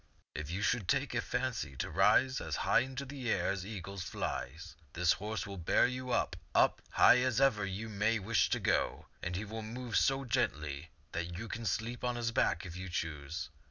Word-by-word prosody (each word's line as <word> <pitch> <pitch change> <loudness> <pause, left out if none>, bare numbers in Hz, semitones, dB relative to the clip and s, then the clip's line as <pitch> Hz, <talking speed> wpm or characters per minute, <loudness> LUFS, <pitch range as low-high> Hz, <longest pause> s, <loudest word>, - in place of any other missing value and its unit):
If 75 -1 -5
you 95 +4 -2
should 100 0 +1
take - - +1
a - - +1
fancy 70 -2 -2
to 65 - -3
rise 105 +9 +4
as - - -3
high - - +5
in 130 +1 -3
the 135 -2 -4
air 95 -4 +2
as 95 -1 -2
the 95 - -7
eagle 100 -2 -6
flies, 85 -2 -4 0.2
this 85 -1 +3
horse 105 -1 -4
will 100 -2 -7
bear 85 - +4
you 125 +1 -3
up, 105 - +1 0.2
up, - - +4
as - - -26
high - - +8
as 125 -1 +1
ever 115 -7 +3
you 100 +4 -4
may 110 +2 +1
wish 105 +2 +2
to - - +1
go; - - 0 0.2
and 90 +1 -3
he 100 +4 -3
will 110 +2 -5
move 115 +1 -5
so 135 0 +3
gently 75 - -1 0.2
that 85 +1 -3
you 110 +4 -5
can 115 +1 -4
sleep 115 +3 -2
on 125 -1 0
his 120 -1 -1
back 95 -5 +1
if 85 -2 -7
you 95 +1 -6
choose. 80 +1 -4
100 Hz, 215 wpm, -33 LUFS, 85-120 Hz, 0.2 s, high